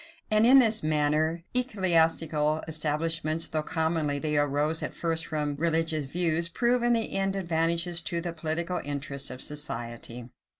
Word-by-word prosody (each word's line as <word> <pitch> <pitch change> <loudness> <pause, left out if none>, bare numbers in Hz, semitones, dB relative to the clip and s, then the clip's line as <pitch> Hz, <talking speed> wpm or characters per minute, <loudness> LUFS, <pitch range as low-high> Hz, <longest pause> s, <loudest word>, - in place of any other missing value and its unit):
And 215 +2 +4
in 265 +2 +8
this 225 -5 +4
manner 155 +2 0
ecclesiastical 165 - +1
establishments, 160 +1 0
though 155 - -2
commonly 160 -2 -1
they 150 +1 -2
arose 145 +2 +1
at - - -5
first 165 -1 0
from 150 -2 -2
religious 160 -1 0
views, 170 +2 +1
prove 240 +7 +1
in 240 0 +2
the 225 -1 -1
end 195 0 0
advantageous 170 -1 0
to 170 -2 -1
the 170 0 -5
political 165 +2 -2
interests 140 -1 -4
of 125 0 -5
society. 120 -4 -5
160 Hz, 145 wpm, -27 LUFS, 150-170 Hz, -, in